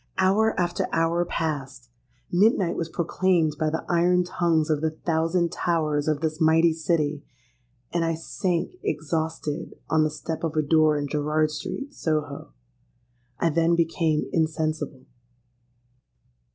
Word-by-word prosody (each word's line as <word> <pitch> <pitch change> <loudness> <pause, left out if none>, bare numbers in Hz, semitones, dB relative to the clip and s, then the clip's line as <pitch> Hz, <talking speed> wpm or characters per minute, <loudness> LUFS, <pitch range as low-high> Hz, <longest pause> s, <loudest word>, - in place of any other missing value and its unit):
Hour 205 +4 +3
after 175 -1 0
hour 165 +1 +2
passed: 135 - -4 0.4
midnight 190 -1 +3
was 165 -1 -3
proclaimed 170 -2 +1
by 155 -1 +1
the 160 +1 -3
iron 180 +1 +3
tongues 170 -3 +1
of 150 -1 +1
the 160 - +1
thousand 165 +2 0
towers 155 -4 0
of 155 -1 0
this 160 0 -2
mighty 160 +1 +5
city;—and 140 -4 -4
I 165 0 0
sank 175 - -2
exhausted 160 0 -3 0.2
on 160 -1 +4
the 155 - +2
step 160 +2 -5
of 165 -1 -2
a 155 - +2
door 155 0 +4
in 145 0 -2
Gerrard 150 +1 0
Street, 275 - -5
Soho. 150 - -3 0.9
I 165 - +1
then 165 +2 +3
became 165 -2 +1
insensible. 155 -4 -1
160 Hz, 130 wpm, -25 LUFS, 150-170 Hz, 0.9 s, mighty